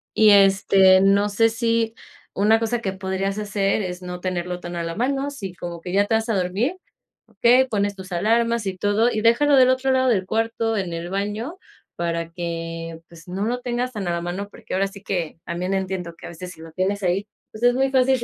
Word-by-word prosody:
y, 215 Hz, -1 st, +6 dB
este, 195 Hz, -1 st, +6 dB
no 200 Hz, +1 st, +4 dB
sé, 225 Hz, +3 st, +3 dB
si 230 Hz, 0 st, 0 dB, 0.4 s
una 215 Hz, +3 st, +4 dB
cosa 230 Hz, +1 st, -1 dB
que 195 Hz, -4 st, -2 dB
podrías 190 Hz, +1 st, -2 dB
hacer 205 Hz, 0 st, 0 dB
es 180 Hz, -1 st, -5 dB
no 180 Hz, 0 st, -6 dB
tenerlo 180 Hz, -1 st, -3 dB
tan 175 Hz, 0 st, -7 dB
a 170 Hz, -, -2 dB
la 165 Hz, 0 st, -3 dB
mano, 270 Hz, +6 st, -1 dB
si 195 Hz, -10 st, -7 dB
como 170 Hz, -1 st, -7 dB
que 180 Hz, -, -6 dB
ya 200 Hz, +2 st, +3 dB
te 225 Hz, -, -1 dB
vas 220 Hz, +1 st, +1 dB
a 225 Hz, -, +1 dB
dormir, 195 Hz, -, 0 dB, 0.5 s
okey, 250 Hz, +2 st, +4 dB
pones 205 Hz, -3 st, -1 dB
tus 190 Hz, -1 st, -10 dB
alarmas 230 Hz, +4 st, +1 dB
y 190 Hz, -1 st, -3 dB
todo 205 Hz, +5 st, +2 dB
y 215 Hz, -, -1 dB
déjalo 255 Hz, +6 st, +4 dB
del 255 Hz, -1 st, +6 dB
otro 260 Hz, +1 st, +2 dB
lado 260 Hz, 0 st, +3 dB
del 195 Hz, -6 st, +1 dB
cuarto, 225 Hz, 0 st, 0 dB
en 185 Hz, -4 st, -2 dB
el 170 Hz, +1 st, -5 dB
baño, 210 Hz, -, -3 dB, 0.4 s
para 170 Hz, -1 st, -2 dB
que 165 Hz, -1 st, -5 dB
pues, 165 Hz, -1 st, -15 dB
no 190 Hz, +3 st, -3 dB
lo 245 Hz, +2 st, -2 dB
tengas 245 Hz, +1 st, -2 dB
tan 205 Hz, -5 st, -4 dB
a -, -, 0 dB
la 170 Hz, 0 st, -2 dB
mano, 180 Hz, +4 st, -4 dB
porque -, -, -10 dB
ahora 195 Hz, +1 st, +2 dB
sí 195 Hz, 0 st, -12 dB
que, 175 Hz, -7 st, -3 dB
también 180 Hz, +3 st, -2 dB
entiendo 190 Hz, -3 st, -3 dB
que -, -, -10 dB
a -, -, -8 dB
veces 180 Hz, +1 st, -8 dB
si 160 Hz, -, -13 dB
lo 165 Hz, 0 st, -10 dB
tienes 195 Hz, +4 st, -1 dB
ahí, 185 Hz, +3 st, 0 dB, 0.2 s
pues, 215 Hz, -, -9 dB
es 245 Hz, 0 st, +5 dB
muy 265 Hz, +2 st, +1 dB
fácil 260 Hz, -1 st, +3 dB
200 Hz, 225 wpm, -22 LUFS, 180-230 Hz, 0.5 s, y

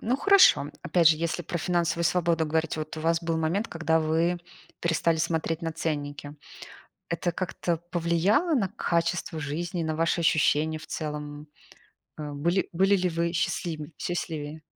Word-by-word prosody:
Ну 245 Hz, +4 st, 0 dB
хорошо, 380 Hz, -, +5 dB
опять 165 Hz, 0 st, +4 dB
же, 160 Hz, -, +4 dB
если 170 Hz, +2 st, -2 dB
про 170 Hz, +1 st, -4 dB
финансовую 170 Hz, -1 st, 0 dB
свободу 170 Hz, -1 st, +2 dB
говорите, 160 Hz, 0 st, -1 dB
вот 155 Hz, +1 st, -6 dB
у -, -, -5 dB
вас 165 Hz, +1 st, +1 dB
был 165 Hz, -1 st, -1 dB
момент, 170 Hz, +8 st, 0 dB
когда 160 Hz, -1 st, +1 dB
вы 165 Hz, +3 st, +1 dB, 0.4 s
перестали 165 Hz, -1 st, +1 dB
смотреть 160 Hz, +1 st, -1 dB
на 165 Hz, -, -2 dB
ценники. 145 Hz, -2 st, -4 dB, 0.8 s
Это 170 Hz, +2 st, -1 dB
как-то 175 Hz, -1 st, -2 dB
повлияло 175 Hz, -, +2 dB
на 210 Hz, -8 st, +1 dB
качество 170 Hz, -4 st, -1 dB
жизни, 165 Hz, +4 st, -3 dB
на 160 Hz, -1 st, -2 dB
ваши 165 Hz, +2 st, +1 dB
ощущения 155 Hz, 0 st, +2 dB
в -, -, -12 dB
целом? 150 Hz, -1 st, -5 dB, 0.7 s
Э, 150 Hz, -1 st, -5 dB
были 170 Hz, +7 st, 0 dB
были 195 Hz, +3 st, +4 dB
ли 185 Hz, -1 st, +1 dB
вы 170 Hz, +1 st, -1 dB
счастлим 160 Hz, -2 st, -2 dB
счастливее? 155 Hz, -3 st, -4 dB
165 Hz, 155 wpm, -27 LUFS, 155-175 Hz, 0.8 s, хорошо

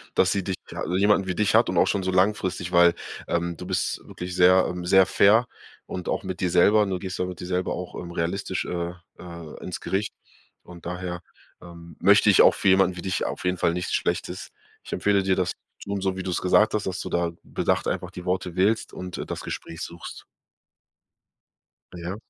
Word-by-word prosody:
dass 95 Hz, -, +4 dB
sie 100 Hz, -, 0 dB
dich 95 Hz, -, -2 dB, 0.2 s
ha -, -, -4 dB
jemanden 100 Hz, 0 st, +3 dB
wie 90 Hz, -, -2 dB
dich 105 Hz, +1 st, +2 dB
hat -, -, +5 dB
und -, -, -1 dB
auch -, -, +5 dB
schon 100 Hz, -, 0 dB
so 95 Hz, -, 0 dB
langfristig, 95 Hz, -2 st, 0 dB
weil, 85 Hz, -1 st, +6 dB, 0.3 s
ähm, 85 Hz, 0 st, -1 dB
du 90 Hz, -, -8 dB
bist 90 Hz, -2 st, -1 dB
wirklich 90 Hz, 0 st, -7 dB
sehr, 90 Hz, +1 st, +5 dB
ähm, 90 Hz, -1 st, -5 dB
sehr 95 Hz, +1 st, +6 dB
fair 110 Hz, +6 st, +4 dB, 0.4 s
und 90 Hz, -, -6 dB
auch -, -, -1 dB
mit 95 Hz, -1 st, -5 dB
dir 90 Hz, -, 0 dB
selber, 105 Hz, +5 st, +5 dB
du 95 Hz, -2 st, -2 dB
gehst 95 Hz, -2 st, -6 dB
ja 90 Hz, -, +1 dB
mit 90 Hz, -2 st, -7 dB
dir 90 Hz, -, -6 dB
selber 90 Hz, 0 st, -1 dB
auch, 90 Hz, -, -6 dB
ähm, 85 Hz, -1 st, -8 dB
realistisch, 90 Hz, +3 st, -2 dB
äh, 85 Hz, 0 st, -3 dB, 0.3 s
äh, 85 Hz, -3 st, -10 dB
ins -, -, -6 dB
Gericht. 100 Hz, +2 st, -2 dB, 0.5 s
Und 85 Hz, -2 st, -13 dB
daher, 90 Hz, 0 st, -4 dB, 0.4 s
ähm, 85 Hz, -2 st, -12 dB
möchte -, -, +5 dB
ich -, -, +7 dB
auch -, -, +7 dB
für -, -, +1 dB
jemanden 95 Hz, -1 st, +4 dB
wie 90 Hz, -, -6 dB
dich 95 Hz, 0 st, -2 dB
auf -, -, -4 dB
jeden 90 Hz, 0 st, 0 dB
Fall 85 Hz, -, +1 dB
nichts 90 Hz, 0 st, -3 dB
Schlechtes. -, -, -2 dB, 0.3 s
Ich -, -, -8 dB
empfehle 100 Hz, -1 st, +2 dB
dir 95 Hz, -1 st, +1 dB
das 90 Hz, -2 st, 0 dB, 0.3 s
zu -, -, -10 dB
tun, 100 Hz, -1 st, -1 dB
so 95 Hz, -1 st, 0 dB
wie 95 Hz, -, -5 dB
du 95 Hz, -, -3 dB
es 85 Hz, -, -1 dB
gesagt 105 Hz, +4 st, +4 dB
hast, 105 Hz, -2 st, -2 dB
dass 95 Hz, 0 st, -3 dB
du -, -, -5 dB
da 85 Hz, -1 st, 0 dB
bedacht -, -, -1 dB
einfach -, -, -3 dB
die 90 Hz, -, -8 dB
Worte 90 Hz, -1 st, -2 dB
wählst 105 Hz, +4 st, +1 dB
und, 90 Hz, -1 st, -7 dB
äh, -, -, -4 dB
das -, -, -5 dB
Gespräch 80 Hz, +1 st, -6 dB
suchst. 85 Hz, +1 st, -8 dB, 1.7 s
Ja. 90 Hz, +2 st, -5 dB
90 Hz, 220 wpm, -25 LUFS, 85-95 Hz, 1.7 s, ich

